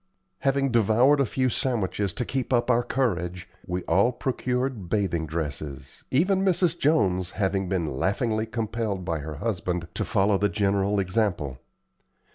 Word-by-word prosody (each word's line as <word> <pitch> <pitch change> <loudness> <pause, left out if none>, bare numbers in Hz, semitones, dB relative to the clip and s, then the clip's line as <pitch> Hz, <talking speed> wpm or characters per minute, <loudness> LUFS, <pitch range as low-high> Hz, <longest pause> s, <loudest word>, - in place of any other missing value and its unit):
Having 135 -1 +1
devoured 120 +5 +4
a 135 - +2
few 130 +4 0
sandwiches 105 -6 0
to 125 - -2
keep 130 0 -3
up 120 0 +3
our 120 0 +3
courage, 90 -8 -1 0.2
we 90 0 -2
all 100 +9 +3
procured 125 -5 -2
bathing 85 -6 0
dresses, 75 -4 -5
even 185 +8 +2
Mrs. 180 -3 +2
Jones 95 - +2
having 95 -2 0
been 90 -3 0
laughingly 110 - -1
compelled 110 -3 -3
by 85 -3 -1
her 75 +1 -6
husband 90 -2 -2
to - - -2
follow 100 0 +2
the 105 - +2
general 100 0 +1
example. 90 - -1
100 Hz, 145 wpm, -26 LUFS, 90-125 Hz, 0.2 s, devoured